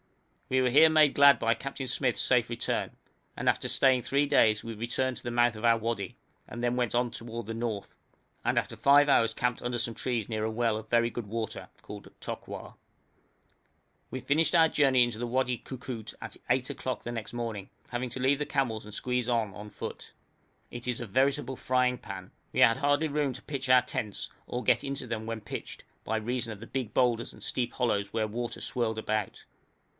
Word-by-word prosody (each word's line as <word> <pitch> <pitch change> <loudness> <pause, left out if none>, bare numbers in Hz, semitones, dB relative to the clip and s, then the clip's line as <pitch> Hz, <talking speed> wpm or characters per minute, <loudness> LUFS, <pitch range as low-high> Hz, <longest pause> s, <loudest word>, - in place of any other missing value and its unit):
We 130 0 +3
were 125 - +3
here 155 +5 +7
made 155 -3 +5
glad 140 0 +7
by 115 0 +3
Captain 135 +2 -5
Smyth's 125 0 0
safe 125 -3 +2
return, 120 0 -2 0.4
and - - -3
after - - +2
staying 130 -2 +4
three 140 +4 +1
days 110 -6 +4
we 115 - -5
returned 120 +4 -1
to - - -11
the 120 - -3
mouth 120 -1 +3
of 110 - -9
our 115 -1 +5
wadi, 110 -4 -3 0.3
and 120 - -7
then 120 0 +1
went 125 -3 0
on 120 0 +1
toward 115 0 -6
the 115 - -4
north, 115 -3 -4 0.5
and - - +1
after - - 0
five 145 +1 +5
hours 115 -5 +4
camped 125 +1 -1
under 120 0 -2
some 115 0 -1
large - - -8
trees 120 -5 -1
near 110 -2 -2
a 110 - 0
well 115 -1 +1
of 110 0 -7
very 115 0 +3
good 120 -3 -6
water, 110 +1 -4
called 105 -1 -10
Tokwar. - - -7 1.4
We 130 - -4
finished 155 +5 +2
our 165 -1 +7
journey 135 -5 +4
into 120 -2 -2
the 120 - -2
Wadi 125 0 0
Koukout 125 -4 -7
at - - -8
8 130 +1 +1
o'clock 130 - -4
next 115 -2 -4
morning, 115 -5 -4 0.2
having 125 +1 -3
to 120 - -6
leave 135 +2 +2
the 150 - -1
camels 120 -7 -1
and 105 0 -11
squeeze 125 +2 -1
on 115 -4 0
on 105 +2 -9
foot. - - -7 0.6
It 120 0 -7
is 125 -2 -1
a 120 - -4
veritable 135 +4 +1
frying 125 0 +1
pan. 95 -2 -8 0.2
We - - -2
had 115 0 +6
hardly 145 +2 +2
room 145 -2 0
to 130 - -9
pitch 135 -3 -4
our 125 0 +7
tents, 105 -3 -4 0.2
or 125 +1 -3
to - - -14
get - - +3
into 140 -1 -4
them 110 -1 -4
when 115 -1 -4
pitched, 105 - -7 0.2
by 110 - -1
reason 120 +1 -2
of 105 - -8
the 115 - -10
big 130 -5 -3
boulders 120 -2 +2
and - - -15
steep 120 -2 -1
hollows 100 -5 0
where 110 -1 0
water 120 +2 -4
swirled 115 -3 -1
about. 110 -2 -2
120 Hz, 210 wpm, -29 LUFS, 115-130 Hz, 1.4 s, here